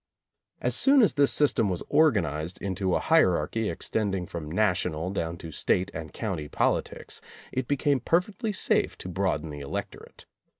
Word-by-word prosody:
As - - +1
soon 275 -2 +5
as 210 - +3
this 140 -1 +3
system 135 -8 +3
was 90 -2 -3
organized 90 - +1
into 95 -1 -1
a - - +2
hierarchy 110 - +2
extending 95 +2 -2
from 80 -3 -7
national 90 -3 0
down 85 -3 -3
to 80 -1 -9
state 90 +5 0
and 80 -1 -6
county 90 -9 -4
politics, - - -2 0.3
it 130 -1 -2
became 145 0 +1
perfectly 195 - 0
safe 195 - +1
to - - -8
broaden 90 -5 -1
the 75 - -7
electorate. 70 -1 -7
95 Hz, 155 wpm, -27 LUFS, 80-135 Hz, 0.3 s, soon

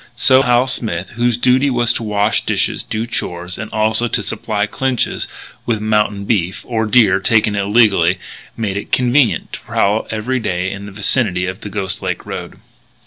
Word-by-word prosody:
So 130 +2 +5
Hal 125 -1 +3
Smith, 100 -8 -2
whose 120 0 0
duty 130 +3 +3
was 120 -2 +2
to - - -2
wash 105 -1 +1
dishes, - - 0
do 110 +1 -3
chores, 90 -6 -4
and 110 - -5
also 110 +2 +1
to 115 -2 -1
supply 105 +1 -1
Clinch's 130 +3 -1 0.4
with 115 -3 0
"mountain 105 -2 0
beef" 95 -3 -1
or 110 -2 -1
deer 105 -5 +4
taken 105 0 +2
illegally 100 -4 +3 0.4
made 105 -4 -2
it 100 - -6
convenient 125 0 +2
to - - -4
prowl 105 +2 0
every 120 +4 -2
day 90 -4 -2
in 100 +1 -7
the - - -9
vicinity 100 -2 +1
of 95 +2 -5
the 105 - -6
Ghost 95 -3 -3
Lake - - -3
road. - - -7
110 Hz, 175 wpm, -17 LUFS, 100-120 Hz, 0.4 s, So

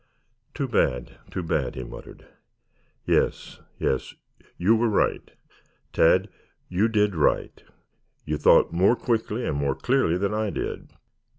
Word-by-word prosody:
"Too 140 -3 -2
bad, 65 - -1
too 90 - -4
bad!" 80 -5 -1
he 65 - -5
muttered. - - -11 0.8
"Yes, - - 0 0.2
yes. 65 - -2 0.4
You 100 +6 +3
were 115 +1 +1
right, 105 - 0 0.6
Tad. 95 +4 +4 0.4
You 95 +5 +2
did 105 -2 +1
right. 80 -4 0 0.6
You - - -2
thought - - +4
more 95 +7 +4
quickly 115 0 -2
and - - -1
more 70 -1 0
clearly 125 -10 +1
than 100 +2 -1
I 110 0 -1
did. - - -5
100 Hz, 130 wpm, -25 LUFS, 80-110 Hz, 0.8 s, Tad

